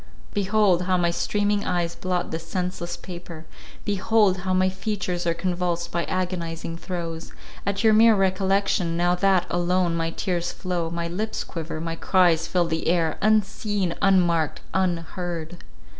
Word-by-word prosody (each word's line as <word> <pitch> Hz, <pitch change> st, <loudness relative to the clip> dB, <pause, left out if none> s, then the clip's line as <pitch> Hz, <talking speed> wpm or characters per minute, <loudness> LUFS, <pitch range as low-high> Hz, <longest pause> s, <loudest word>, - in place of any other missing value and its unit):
Behold, 200 Hz, -2 st, +3 dB
how 185 Hz, 0 st, +2 dB
my 170 Hz, -1 st, +2 dB
streaming 205 Hz, +3 st, 0 dB
eyes 175 Hz, -1 st, -1 dB
blot 180 Hz, 0 st, -2 dB
this 165 Hz, 0 st, -5 dB
senseless 180 Hz, -2 st, -3 dB
paper—behold, 185 Hz, +4 st, -1 dB
how 185 Hz, +1 st, -2 dB
my 185 Hz, 0 st, +3 dB
features 185 Hz, -2 st, -2 dB
are 165 Hz, -, +1 dB
convulsed 175 Hz, -1 st, -2 dB
by 170 Hz, -, -1 dB
agonizing 170 Hz, -3 st, -3 dB
throes, 170 Hz, -2 st, -5 dB, 0.3 s
at 200 Hz, +1 st, 0 dB
your 220 Hz, -1 st, +6 dB
mere 225 Hz, +1 st, +7 dB
recollection, 190 Hz, -2 st, +1 dB
now 175 Hz, +1 st, +3 dB
that, 185 Hz, 0 st, +3 dB
alone, 175 Hz, 0 st, +1 dB
my 165 Hz, 0 st, 0 dB
tears 175 Hz, 0 st, -2 dB
flow, 175 Hz, -3 st, -3 dB
my 170 Hz, 0 st, -3 dB
lips 210 Hz, +6 st, -3 dB
quiver, 160 Hz, -1 st, -5 dB
my 165 Hz, 0 st, -3 dB
cries 170 Hz, -2 st, +3 dB
fill 180 Hz, -2 st, +1 dB
the 160 Hz, -1 st, -2 dB
air, 165 Hz, -2 st, +1 dB
unseen, 205 Hz, -3 st, +1 dB
unmarked, 175 Hz, -5 st, +2 dB
unheard! 175 Hz, -2 st, -2 dB
180 Hz, 145 wpm, -24 LUFS, 170-190 Hz, 0.3 s, mere